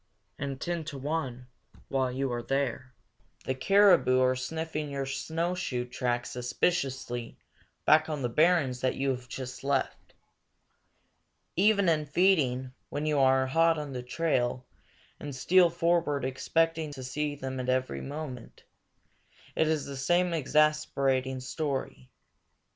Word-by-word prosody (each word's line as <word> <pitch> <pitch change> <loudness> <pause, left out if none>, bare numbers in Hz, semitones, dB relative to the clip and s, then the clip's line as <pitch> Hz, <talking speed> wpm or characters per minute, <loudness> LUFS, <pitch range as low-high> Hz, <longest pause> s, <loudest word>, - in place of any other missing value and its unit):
And, 140 -1 -4
ten 170 +1 -2
to 150 -2 -6
one, 135 -3 -3 0.4
while 130 -2 0
you 130 0 -2
are 120 - -2
there, 130 -1 -2 0.5
the 130 - 0
caribou 180 -2 +5
are 130 0 +3
sniffing 155 +3 -4
your 140 -1 -3
snowshoe 160 -1 -2
track 120 0 -2
suspiciously 125 -2 -2 0.5
back 155 +1 +5
on 150 -3 -3
the - - +2
barrens 140 -2 +2
that 130 - +1
you 135 0 0
have 125 -1 -6
just 130 -1 -7
left. 135 -1 -2 1.4
Even 200 +1 +3
in 155 -2 +2
feeding, 140 -7 +2 0.2
when 145 +1 -3
you 150 -2 +1
are 130 0 +4
hot 165 +4 +3
on 145 -2 -5
their 125 - -4
trail 125 -2 -1 0.5
and 145 -2 -6
steal 175 +6 +4
forward 165 -5 +1
expecting 160 +4 0
to 130 -2 -8
see 145 +3 -2
them 130 -2 -5
every 130 0 0
moment, 140 -4 -7 0.9
it 160 - +2
is 155 -2 0
the 140 - -6
same 175 +6 +1
exasperating 140 -4 +1
story. 135 -1 -4
140 Hz, 130 wpm, -29 LUFS, 130-160 Hz, 1.4 s, caribou